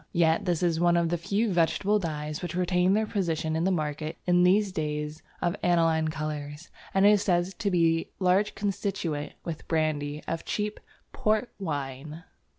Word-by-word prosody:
Yet 165 0 +3
this 175 -1 0
is 165 -2 +2
one 175 0 +4
of 170 -1 +2
the 175 - 0
few 205 +4 0
vegetable 190 +5 +2
dyes 150 -4 -4
which 175 -2 -4
retain 180 +1 +2
their 220 +1 +2
position 165 -6 -1
in 165 +2 0
the - - +3
market 155 -2 -2
in 180 0 +4
these 195 +3 +4
days 150 -2 -3 0.2
of 175 +2 +1
aniline 165 -2 +3
colours, 150 +1 -5 0.2
and 195 +1 +3
it 205 - +8
is 205 -2 +4
said 175 -3 +2
to 205 - 0
be 165 -3 +3
a - - -12
large 190 +3 +3
constituent, 195 -7 -2
with 165 -2 -6
brandy, 150 -2 -1
of 165 0 -3
cheap 210 0 -3 0.3
"port 215 +3 0
wine." 150 -1 -5
170 Hz, 175 wpm, -27 LUFS, 155-190 Hz, 0.3 s, it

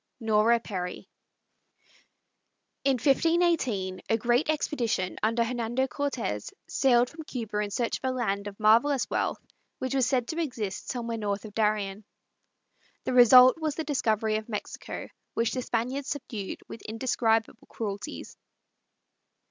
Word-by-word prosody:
NORA 225 +1 +3
PERRY. 180 -5 -5 1.8
In 275 0 +3
1518 270 - +1
a 225 - +3
great 240 +5 +1
expedition, 240 -11 -1
under 230 +2 +2
Hernando 240 +2 -1
Cortez, 255 - -3 0.2
sailed 245 -2 +3
from 325 - -9
Cuba 230 -8 -4
in 210 -1 -1
search 235 +3 -1
of 260 - -1
a - - 0
land 205 -5 -1
of 200 0 -9
marvellous 235 +6 +4
wealth - - 0 0.4
which 260 0 -3
was 265 -2 +2
said 255 -3 0
to 330 +1 -1
exist 225 - -4
somewhere 235 -2 -3
north 205 0 -2
of 210 - -9
Darien. 210 -2 0 1.0
The - - -2
result 250 +3 +8
was 310 -3 -1
the 320 - -2
discovery 220 -7 +1
of 220 +1 -7
Mexico, 210 -2 -5 0.3
which 230 0 +1
the 255 - -2
Spaniards 250 +4 -2
subdued 230 -8 -5
with 225 - -9
indescribable 225 -1 0
cruelties. 215 +6 -6
235 Hz, 135 wpm, -28 LUFS, 215-260 Hz, 1.8 s, result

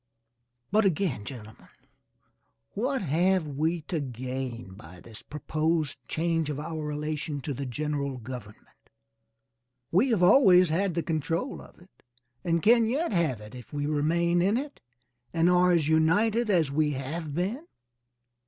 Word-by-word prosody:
But 215 +2 +4
again 180 - 0
gentlemen, 110 -5 -10 1.0
what 260 +3 -1
have 180 +3 +2
we 155 +4 -1
to 165 +1 -3
gain 125 -4 -5
by 90 -1 -13
this 110 +3 -12
proposed 155 -1 -2
change 165 -1 -1
of 145 -1 -3
our 155 0 -5
relation 150 0 -3
to 145 +2 -4
the 135 +1 -5
general 140 +1 -3
government? 120 -3 -11 1.0
We 205 +10 +3
have 215 -7 +2
always 180 - +6
had 180 +2 0
the 170 - 0
control 165 - -2
of - - -16
it 180 +2 -22 0.4
and 170 -2 0
can 230 0 +5
yet 285 +7 -1
have 155 - 0
if 125 -1 -11
we 145 0 -2
remain 170 +4 +1
in 200 +5 +2
it 285 +2 -6 0.6
and 165 +1 +3
are 180 0 +4
as 165 -4 +2
united 205 +9 +2
as 165 -8 +2
we 150 +1 +1
have 145 +3 -5
been. 215 - -2
160 Hz, 145 wpm, -27 LUFS, 140-180 Hz, 1.0 s, always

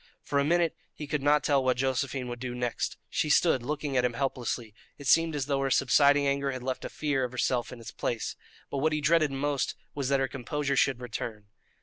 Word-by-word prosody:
For 140 - 0
a - - +3
minute 170 +2 +2 0.2
he 150 - -6
could 145 0 -2
not 145 +1 +3
tell 140 -2 +3
what 130 -1 +2
Josephine 130 0 -1
would 120 0 -5
do 125 0 -4
next. 125 -1 -2
She 155 - -1
stood 150 -3 +4
looking 145 +2 -3
at 125 - +3
him 125 -1 +1
helplessly; 120 -3 -2 0.2
it 140 - -10
seemed 165 +4 +4
as 140 -3 -1
though 140 -1 0
her 135 0 0
subsiding 140 +2 +4
anger 140 0 +1
had 130 -2 -6
left 130 0 -3
a - - -4
fear 145 -3 -1
of 125 - -2
herself 125 -1 0
in 125 - -9
its 115 - -8
place. 115 - -3 0.4
But 140 - -1
what 155 +2 +2
he 155 - +1
dreaded 155 0 +3
most 140 0 -1 0.2
was 140 -2 -2
that 140 -1 +3
her 135 - +1
composure 140 +2 -2
should 135 -2 +2
return. 110 -3 -6
135 Hz, 230 wpm, -28 LUFS, 125-145 Hz, 0.4 s, stood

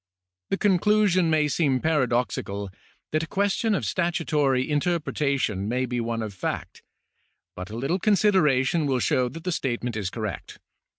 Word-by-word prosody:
The - - 0
conclusion 200 -2 +3
may 155 -1 +3
seem 140 -3 +1
paradoxical 120 -9 -1 0.4
that 155 - +1
a 165 - -4
question 205 +4 +1
of - - -2
statutory 150 -7 0
in 150 -1 +1
terpretation 140 - -1
may 125 +3 0
be 125 -1 -2
one 115 -1 -2
of 105 -2 -5
fact, 95 - -5 0.7
but 90 0 -7
a 110 - -7
little 140 +10 -1
consideration 170 -8 +3
will 135 -2 +1
show 125 +1 +1
that 165 +6 -9
the 180 - -2
statement 120 -6 -2
is 100 -4 -2
correct. 110 -4 -6
145 Hz, 155 wpm, -25 LUFS, 120-175 Hz, 0.7 s, conclusion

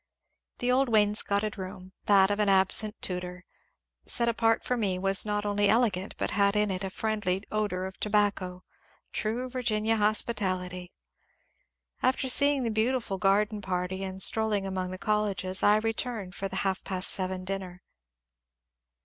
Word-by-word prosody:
The 245 0 0
old 265 +1 +2
wainscotted 210 -1 +1
room 185 0 -8
— - - -43
that 195 -1 +5
of 205 - -1
an 210 -1 +3
absent 195 +3 +3
tutor 180 0 -4 0.3
— - - -55 0.3
set 235 - +1
apart 225 -1 +1
for 250 - -1
me 200 -6 -1
was 195 +2 +2
not 210 0 -1
only 205 0 +1
elegant 210 -4 +1
but - - -2
had 200 0 +2
in 210 -1 +2
it 185 +1 -3
a 190 - -3
friendly 200 -2 -1
odour 205 -4 -1
of 190 0 -9
tobacco, 200 -3 0 0.2
— - - -36
true 230 +4 -2
Virginia 225 -3 0
hospitality. 185 -4 0 1.1
After 260 +1 +1
seeing 285 +1 +3
the 230 - -1
beautiful 220 -2 -1
garden 205 +2 +1
party 185 0 -3
and 190 0 -6
strolling 210 0 +2
among 190 -1 -3
the 185 - -6
colleges, 195 -2 -1
I 205 - +5
returned 225 -3 -3
for 195 - -4
the 190 - -8
half 190 -1 -1
past 185 -1 0
seven 185 -1 -2
dinner. 185 -1 -5
205 Hz, 160 wpm, -28 LUFS, 190-220 Hz, 1.1 s, that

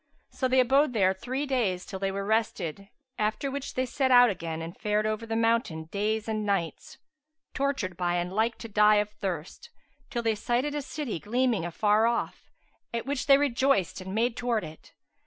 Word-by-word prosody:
So 260 - -1
they 260 +1 +3
abode 265 +2 +4
there 190 -4 +3
three 255 +9 -3
days 220 -10 0
till 190 - -7
they 195 0 -1
were 195 +1 -3
rested, 200 -4 -1 0.3
after 215 +6 -1
which 280 0 -5
they 255 - +1
set 260 +1 0
out 245 -2 +7
again 165 -3 -5
and 165 +1 -7
fared 210 0 0
on 215 - +1
over 215 +1 -5
the 225 - -2
mountain 225 -8 +1
days 215 +2 -1
and 215 -1 -1
nights, 195 -6 -2 0.6
tortured 270 -11 -1
by 175 -1 0
and 175 +1 -2
like 220 +3 +1
to 230 - -8
die 210 0 +5
of 210 0 +1
thirst, 185 -6 -5 0.4
till 235 -1 -3
they 225 -1 +2
sighted 240 +7 -1
a 295 - -2
city 275 - -4
gleaming 235 -3 0
afar 210 +6 +2
off, 235 0 -2 0.4
at 230 -1 -3
which 280 0 -2
they 275 -1 +8
rejoiced 265 - +1
and 190 +1 -6
made 230 +1 +1
towards 240 -3 -1
it. 155 0 -13
220 Hz, 195 wpm, -28 LUFS, 195-250 Hz, 0.6 s, they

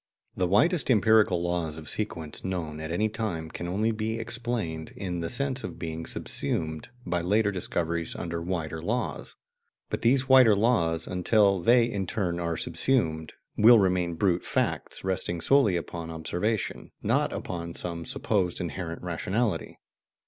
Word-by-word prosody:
The 90 - +1
widest 145 - +3
empirical 110 -6 +4
laws 85 -3 -2
of 80 - -9
sequence 80 -8 -4
known 85 -5 -3
at 80 0 -5
any 105 +6 +1
time 100 -8 -4
can 85 - -5
only 105 +5 0
be 110 +1 -2
"explained" 115 -8 -3
in 90 -3 -4
the 85 - -3
sense 130 0 -2
of - - -6
being 80 -1 -5
subsumed 80 +2 -1 0.2
by 90 -1 -1
later 105 +4 +2
discoveries 85 -3 -2
under 85 0 -4
wider 80 -2 -3
laws; 120 +8 -3 0.6
but - - -2
these 130 +3 +3
wider 130 -5 +7
laws, 85 -7 +2
until 100 +2 +3
they 120 +7 +5
in 100 -5 -3
turn 90 -4 -1
are 85 -1 -2
subsumed, 80 -12 0 0.2
will 115 +2 +8
remain 90 -4 +1
brute 90 0 +1
facts, - - -2
resting 90 -2 -1
solely 120 0 +4
upon 85 0 -5
observation, 90 +6 -2
not - - +1
upon 85 -2 -5
some 85 -1 -4
supposed 90 -1 -1
inherent 85 0 -5
rationality. 95 +6 -2
90 Hz, 150 wpm, -27 LUFS, 85-110 Hz, 0.6 s, will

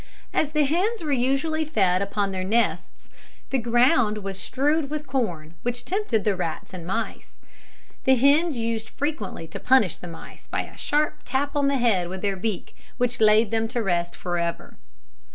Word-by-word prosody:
As 300 -1 +1
the 305 -1 +3
hens 365 +8 0
were 300 - -2
usually 275 +5 +1
fed 195 - +2
upon 200 0 -1
their 185 -1 -3
nests, 225 +5 -1 0.4
the 270 - +2
ground 240 -1 +3
was 195 -2 -5
strewed 285 - 0
with 300 0 -4
corn, 180 - -2
which 245 0 -3
tempted 360 - 0
the 205 -2 +2
rats 175 0 -4
and 175 -2 -7
mice. 190 - -4 0.7
The 265 - +6
hens 285 +4 +4
used 225 -1 -2
frequently 275 - -3
to - - -6
punish 250 - +3
the 175 - -9
mice 165 - -11
by - - -1
a - - -13
sharp 300 +1 0
tap 280 +3 -1
on 285 -1 +2
the 280 0 +2
head 200 -8 +2
with 190 +2 -6
their 200 -1 +1
beak, 195 0 -4 0.2
which 245 0 0
laid 215 0 +5
them 225 0 +1
to 235 0 -2
rest 175 -3 0
for 175 0 -2
ever. 170 0 -3
235 Hz, 180 wpm, -25 LUFS, 195-280 Hz, 0.7 s, The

